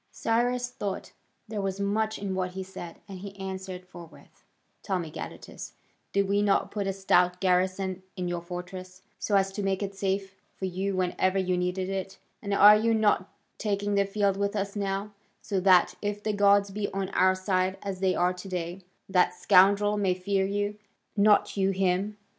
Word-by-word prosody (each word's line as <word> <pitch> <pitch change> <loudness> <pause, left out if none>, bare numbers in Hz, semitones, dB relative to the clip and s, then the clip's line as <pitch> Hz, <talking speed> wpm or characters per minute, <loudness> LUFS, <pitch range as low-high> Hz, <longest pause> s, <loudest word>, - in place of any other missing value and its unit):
Cyrus 245 +2 0
thought 200 -5 -5 0.4
there 215 -1 -3
was 195 0 -3
much 215 +2 0
in 200 -1 -3
what 185 -1 -2
he 190 0 -4
said, 180 -2 -9
and 195 -2 -8
he 200 +1 -9
answered 190 -1 -6
forthwith: 175 -2 -14 0.4
"Tell 190 -3 -1
me, 165 -3 -5
Gadatas, - - -8 0.4
did 200 0 +1
we 200 +1 +2
not 205 -1 +2
put 200 -2 -2
a - - +1
stout 180 -2 +2
garrison 185 0 +1
in 180 -2 -3
your 175 -1 -2
fortress, 185 +1 -8 0.2
so 205 - 0
as 195 0 +3
to 205 - -4
make 195 0 0
it 200 0 -4
safe 195 0 -2 0.2
for 190 - -4
you 190 +2 -2
whenever 185 +1 +1
you 185 -1 +1
needed 180 +1 -1
it, 195 0 -4 0.2
and 200 - -5
are 205 +1 +8
you 225 +1 +2
not 210 -3 +2 0.3
taking 205 -1 -1
the 200 0 +3
field 200 -1 0
with 200 +1 -1
us 200 0 -2
now, 200 +1 -2 0.3
so 195 - -2
that, 180 -1 +5
if 205 0 -3
the 215 - 0
gods 200 0 +4
be 200 +1 -3
on 195 -1 -2
our 185 0 +3
side 185 0 0
as 195 -2 -4
they 190 -1 +2
are 180 +1 +2
to 180 +2 -9
day, 180 +1 -4 0.3
that 180 -1 +2
scoundrel 200 +3 +4
may 190 -3 +1
fear 190 +1 0
you, 205 +1 -2 0.4
not 210 0 +4
you 195 -1 +2
him? 195 +2 0
195 Hz, 190 wpm, -28 LUFS, 185-200 Hz, 0.4 s, are